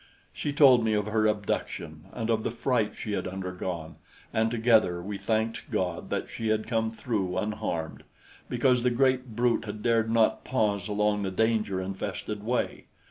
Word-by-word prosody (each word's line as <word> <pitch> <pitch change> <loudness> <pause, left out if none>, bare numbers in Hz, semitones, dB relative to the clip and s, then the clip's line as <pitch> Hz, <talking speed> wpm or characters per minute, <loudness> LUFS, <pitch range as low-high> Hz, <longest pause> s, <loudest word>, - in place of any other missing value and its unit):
She 145 - -2
told 135 -5 +6
me 110 -1 +2
of 105 -1 +1
her 110 0 +2
abduction 85 -7 -3
and 115 -1 -2
of 110 -1 +2
the - - -1
fright 120 -1 0
she 105 - -4
had 95 -2 -1
undergone, 90 -3 -5 0.4
and 110 0 +2
together 110 -6 +3
we 100 +3 -5
thanked 110 +1 -1
God 90 -2 -2
that - - -2
she 115 - -4
had 110 0 +1
come 115 -1 0
through 105 -6 -2
unharmed, 85 -6 -3 0.5
because 125 0 +3
the 125 - +3
great 130 -1 +1
brute 120 -2 +2
had 105 0 -6
dared 115 -1 +2
not 115 -1 +3
pause 105 -5 0
along 105 0 +1
the 95 - -1
danger 105 -1 +1
infested 100 +2 -4
way. 120 +3 -1
110 Hz, 170 wpm, -28 LUFS, 100-115 Hz, 0.5 s, told